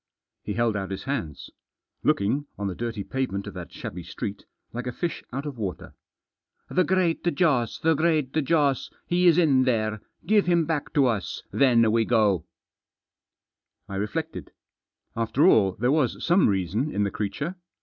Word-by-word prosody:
He 105 - -4
held 115 -2 +1
out 95 -2 -3
his 95 - -5
hands. 110 - -4 0.5
Looking, 135 +9 +1
on 100 - -4
the 95 - -1
dirty 115 0 -4
pavement 125 -5 -3
of - - -7
that - - -8
shabby 90 - -7
street, 100 +4 -6 0.3
like 125 +1 -4
a - - -1
fish 170 +7 -4
out 135 +4 -4
of 140 -5 -6
water. 95 -4 -5 0.8
"The 185 - +3
Great 180 -2 +1
Jossl 145 -8 +1
The 165 0 +4
Great 155 -3 +1
Joss! 145 -3 +1 0.2
He 180 +1 +2
is 170 -1 +6
in 145 -7 +4
there 110 -4 0
— - - -33
give 210 -3 +3
him 170 -2 +3
back 155 -2 -2
to 140 -2 +5
us 110 -7 -2
— - - -41
then 115 -5 +5
we 115 0 +2
go." 105 -6 +2 1.4
I 100 - -5
reflected. 160 +11 -4 0.7
After 115 +7 +2
all 95 - +5
there 120 +7 0
was 145 -6 +1
some 175 - +4
reason 100 - 0
in 105 -7 0
the 100 - -1
creature. 140 - -3
125 Hz, 170 wpm, -25 LUFS, 105-155 Hz, 1.4 s, is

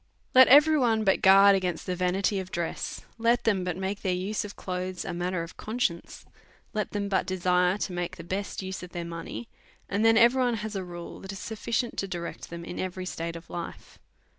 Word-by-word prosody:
Let 260 0 +9
every 300 +3 +7
one 225 -4 +2
but 190 -2 +2
guard 195 +1 +8
ag 190 - -1
ainst 175 -2 -2
the 185 - -2
vanity 190 +3 +1
of 185 -1 -6
dress, 170 -2 -4 0.2
let 235 +1 +3
them 200 -5 +2
but 180 -1 -2
make 190 +2 -3
their 185 -2 0
use 195 +4 -2
of 205 -1 -8
clothes 185 -1 -4
a - - -3
matter 175 0 -2
of 165 - -11
con 225 +3 -5
science, 170 -8 -2 0.5
let 210 -1 -1
them 205 -1 -2
but 190 -2 0
desire 180 0 +2
to 195 - -3
make 175 -1 -3
the 170 - -8
best 195 +3 -4
use 190 0 -5
of 180 -1 -10
their 170 -1 -4
money, 170 +7 -6 0.4
and 200 +2 0
then 225 0 +6
every 240 +3 +5
one 245 -2 +2
has 215 0 -5
a 190 - -2
rule 175 -1 -8
that 195 - -7
is 195 - -7
suf 220 +3 -7
ficient 235 +1 -1
to 195 - -1
direct 175 -2 -6
them 170 0 -7
in 175 - -6
every 185 0 -4
state 170 -2 -4
of 165 0 -10
life. 170 -1 -8
190 Hz, 230 wpm, -27 LUFS, 180-210 Hz, 0.5 s, Let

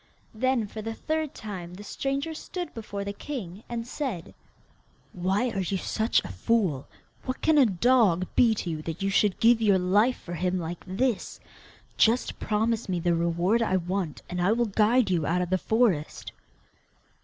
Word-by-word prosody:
Then 250 0 +1
for 215 +1 -7
the 225 +1 -5
third 315 +1 -2
time 180 -5 -7
the 205 - -10
stranger 275 +8 -3
stood 350 +2 -6
before 205 -3 -5
the 200 0 -4
king, 205 -6 -7
and 235 -1 -3
said: 245 - -4 0.8
'Why 195 +7 0
are 195 - -3
you 190 +1 -1
such 220 +4 0
a - - -6
fool? 190 - 0 0.4
What 255 - -4
can 315 -2 +4
a 265 - +6
dog 195 -3 +3
be 230 -3 +5
to 185 - -4
you, 155 -1 -4
that 165 +4 -5
you 195 - +1
should 200 0 +2
give 230 0 +5
your 205 -3 +4
life 205 +7 +2
for 175 - -9
him 180 +2 -1
like 170 0 -5
this? 220 +4 -1 0.6
Just 230 +3 +2
promise 220 +1 0
me 180 -2 0
the 175 0 +1
reward 170 +6 +1
I 190 -4 +2
want, 180 -2 -3
and 180 0 -3
I 190 +5 +3
will 240 +1 +1
guide 215 +1 +3
you 165 -5 +1
out 180 +2 +1
of 180 - -6
the 185 - +2
forest. 220 -10 0
205 Hz, 180 wpm, -27 LUFS, 180-235 Hz, 0.8 s, a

